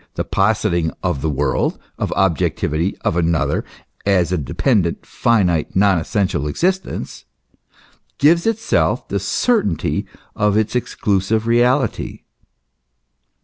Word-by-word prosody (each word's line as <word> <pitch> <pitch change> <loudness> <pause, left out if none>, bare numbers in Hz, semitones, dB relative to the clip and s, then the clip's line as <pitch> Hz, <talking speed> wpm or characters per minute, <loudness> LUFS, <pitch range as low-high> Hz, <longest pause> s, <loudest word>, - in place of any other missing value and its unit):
the - - -1
positing 95 -5 +1
of 65 - -1
the 80 - 0
w~orld, 70 -1 0 0.2
of - - -2
objectivity, 85 -1 0
of - - 0
another, 85 -2 +1 0.4
as 90 -4 +2
a 90 - +1
dependent, 90 - 0
finite, 90 -9 +1
non 95 -2 +4
essential 90 -4 -1
existence, 185 - -2 0.9
gives 170 +6 +4
itself 225 0 0
the - - -1
certainty 160 - 0 0.3
of 105 0 +2
its 110 +2 0
exclusive 105 -2 0
reality. 125 +4 +1
100 Hz, 105 wpm, -19 LUFS, 85-115 Hz, 0.9 s, non